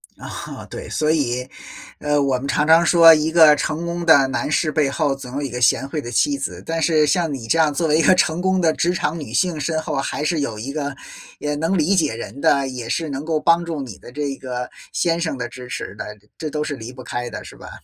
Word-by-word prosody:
啊， - - -8
对， - - -8
所 155 0 +1
以， 125 -4 -1 0.5
呃， 150 0 +1
我 135 -2 +1
们 140 - -5
常 150 - +1
常 165 +1 +6
说 165 -1 +8
一 155 0 +1
个 160 -3 +7
成 155 +3 -2
功 170 0 -3
的 155 -5 +6
男 135 - -2
士 155 0 +1
背 150 -2 +1
后 140 0 0
总 130 -2 -10
有 145 - -2
一 140 - -3
个 125 +1 -5
贤 135 +2 +3
惠 150 +1 -4
的 120 - -7
妻 285 - +1
子， - - -5
但 165 0 -2
是 155 -2 +3
像 160 +2 +1
你 130 -5 -5
这 165 - +2
样 155 -2 +4
作 160 +3 -1
为 155 +1 +3
一 - - +5
个 175 +4 +5
成 165 -1 +1
功 190 0 +1
的 160 -3 +3
职 175 +1 0
场 165 0 -2
女 145 - -8
性 175 -5 0
身 160 +3 -1
后 160 - -4
还 140 +2 -2
是 160 +1 0
有 130 -7 -3
一 130 +6 -5
个， 145 -2 -3 0.4
也 150 +1 -3
能 165 +6 0
理 175 +5 +2
解 155 -9 +1
人 130 +4 -8
的， 140 -1 +3
也 125 -3 -6
是 160 +3 -1
能 140 +1 -4
够 160 -1 0
帮 170 +2 +3
助 165 -3 -4
你 125 -7 -7
的 - - -13
这 140 0 -3
个 125 -1 -5 0.2
先 170 -1 0
生 160 -6 -2
的 125 - -3
支 125 -1 -10
持 145 +4 -5
的， 105 - -7 0.2
这 155 -2 -5
都 150 0 -2
是 150 -1 -4
离 115 -1 -8
不 130 0 -11
开 120 0 -4
的， - - -7
是 - - -12
吧？ - - -11
150 Hz, 280 characters per minute, -21 LUFS, 135-165 Hz, 0.5 s, 说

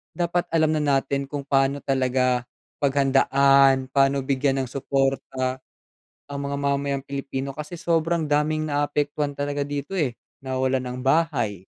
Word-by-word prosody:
dapat 175 0 0
alam 155 -1 +3
na 155 - +1
natin 140 -1 +1
kung 145 -1 -4
paano 135 0 +2
talaga 130 -2 +1 0.4
paghandaan, 135 -1 +4
paano 135 -1 +3
bigyan 135 0 +1
ng - - -11
suporta 135 -1 -1 0.7
ang 140 - -4
mga 140 - -2
mamayang 140 -1 -1
Pilipino. 135 0 -4
Kasi 150 +4 -7
sobrang 165 -1 0
daming 150 +1 0
naapektuhan 145 0 -1
talaga 145 0 -2
dito 145 +2 -5
eh, 130 -7 0 0.3
nawawalan 130 -1 -1
ng - - -7
bahay 130 - +1
140 Hz, 130 wpm, -24 LUFS, 135-145 Hz, 0.7 s, paghandaan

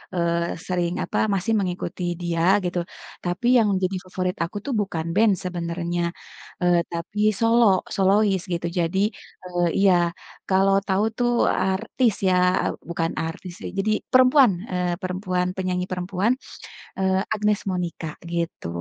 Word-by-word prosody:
eee, 170 0 0
sering 175 -2 0
apa - - -3 0.2
masih 195 +4 -1
mengikuti 180 -1 -3 0.2
dia 170 -1 -1 0.2
gitu, 175 0 -1 0.4
tapi 180 +7 -1
yang 215 -2 +3
jadi 185 +1 0
favorit 185 0 -2
aku 170 - -7
tuh 280 - -2
bukan 165 -5 -3
band 215 0 +5
sebenarnya, 175 -1 -2 0.6
eee, 175 -1 +4
tapi 170 +5 -5 0.2
solo, 230 +1 +4 0.3
solois 195 0 +3
gitu. 170 0 -2
Jadi, 170 +3 0 0.5
eee 175 -1 0
iya 195 -1 +5 0.6
kalau 195 +1 +4
tahu 195 +1 +2
tuh 240 -1 +2 0.2
artis 195 +5 +1
ya. 185 - +4 0.6
Bukan 165 -1 -1
artis 175 +2 -7
sih - - -5
jadi 210 +2 +1 0.2
perempuan, 255 -1 +6 0.2
eee 180 -1 0
perempuan, 185 -1 -1
penyanyi 180 -1 -1
perempuan, 185 +4 0 0.7
eee 190 0 +2
Agnez 210 -1 +1
Monica 175 -3 -3 0.2
gitu. 170 - -3
185 Hz, 135 wpm, -23 LUFS, 175-200 Hz, 0.7 s, perempuan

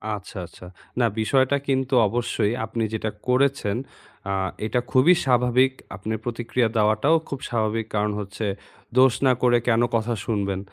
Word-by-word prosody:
আচ্ছা, 100 -1 -10
আচ্ছা। 90 - -14 0.3
না 120 - +4
বিষয়টা 130 +5 +2
কিন্তু 135 0 0
অবশ্যই 115 -1 -1
আপনি 115 +1 -3
যেটা 110 0 -2 0.2
করেছেন 125 -5 +1 0.6
আ - - 0 0.3
এটা 110 +3 0
খুবই 130 +8 +6
স্বাভাবিক, 125 0 +3 0.2
আপনার 110 +4 -4
প্রতিক্রিয়া 120 0 0
দেওয়াটাও 110 +8 +3
খুব 140 - -4
স্বাভাবিক 110 -1 -1
কারণ 105 0 +1
হচ্ছে, 105 +2 -5 0.5
দোষ 130 -1 +6
না 130 - +6
করে 120 -1 +5
কেন 115 0 +3
কথা 115 +1 0
শুনবেন? 100 -4 -1
115 Hz, 145 wpm, -24 LUFS, 110-130 Hz, 0.6 s, খুবই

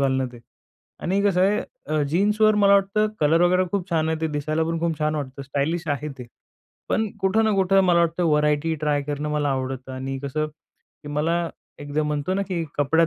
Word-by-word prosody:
घालणं 130 -1 +1
ते 120 - -11 0.6
आणि 195 +3 +1
कसं 195 -3 +2
आहे 200 +3 +3 0.3
अ, 155 0 0
जीन्सवर 210 +6 +3
मला 200 -1 +5
वाटतं 200 +2 +2
कलर 155 +3 +4
वगैरे 180 +1 +4
खूप 195 -2 -1
छान 160 -1 +1
आहे. 160 0 -1
ते 160 - +1
दिसायला 155 +1 -1
पण 165 0 -2
खूप 165 -2 -1
छान 155 0 0
वाटतं, 140 -2 -5
स्टायलिश 145 +5 -2
आहे 145 +1 -1
ते. 125 - -8 0.6
पण 220 - +1
कुठं 210 +4 +2
ना 220 - +3
कुठं 195 0 +4
मला 175 -1 +4
वाटतं 170 +1 +1
व्हरायटी 150 +1 +2
ट्राय 145 -1 +1
करणं 145 +1 -3
मला 150 -1 0
आवडतं 130 -1 -3
आणि 135 +1 -4
कसं 145 +3 -2
की 150 -1 -18
मला 165 +3 0 0.3
एकदा 145 +1 -2
म्हणतो 150 +4 -1
ना 200 - 0
की 170 -3 -1
कपड्यात 160 +3 +3
155 Hz, 200 wpm, -23 LUFS, 145-180 Hz, 0.6 s, मला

